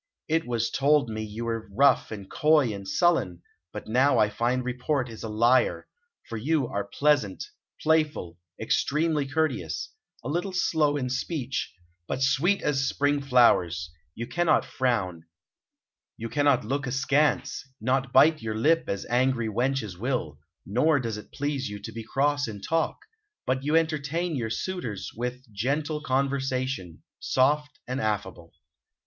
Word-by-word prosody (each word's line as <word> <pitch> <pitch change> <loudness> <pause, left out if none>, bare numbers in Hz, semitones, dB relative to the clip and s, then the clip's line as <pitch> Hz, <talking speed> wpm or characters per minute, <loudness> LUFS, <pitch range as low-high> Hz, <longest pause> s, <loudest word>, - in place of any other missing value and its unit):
"It 160 -2 0
was 115 -1 -1
told 140 -2 +3
me 110 0 -3
you 110 +2 -5
were 115 -3 -3
rough 135 +4 +4
and 100 -3 -7
coy 150 -5 +3
and 100 -1 -7
sullen, 95 - +1 0.3
but 105 - -7
now 130 +6 +3
I 105 - +4
find 125 +3 0
report 125 +2 -1
is 115 -2 -10
a 110 - -5
liar; 120 +4 +2 0.4
for 115 - -5
you 145 +3 +1
are 100 -2 -2
pleasant, 145 -10 +1 0.3
playful, 155 - 0 0.2
extremely 150 -1 +1
courteous; 135 - -2 0.3
a - - -5
little 175 +6 -2
slow 155 -5 +2
in 125 -3 -2
speech, 135 0 -2 0.4
but 130 - -1
sweet 165 +9 +2
as 135 -2 +1
spring 145 0 +1
flowers; 90 -11 +3 0.2
you 115 - -4
cannot 175 +5 +2
frown, 95 -10 -1 0.9
you 115 +1 -5
cannot 145 -2 +2
look 140 +4 -2
askance, 140 +3 +1 0.2
not 130 +2 0
bite 155 +4 +5
your 110 -1 -3
lip 160 +9 +3
as 100 - -3
angry 125 -2 +1
wenches 115 -4 -1
will; 115 - -2 0.3
nor 140 - +2
does 115 -4 -3
it 105 - -11
please 140 -4 -2
you 105 - -6
to 100 +3 -8
be 115 +1 -7
cross 145 +4 0
in 105 -2 -6
talk, 165 +9 0 0.5
but 130 0 0
you 150 +3 +1
entertain 160 +1 -1
your 115 -4 -2
suitors 115 - -4
with 125 +2 -4
gentle 145 +8 -1
conversation, 130 - -1 0.2
soft 145 +2 +1
and 130 +2 -2
affable." 95 -5 -3
130 Hz, 150 wpm, -27 LUFS, 110-145 Hz, 0.9 s, bite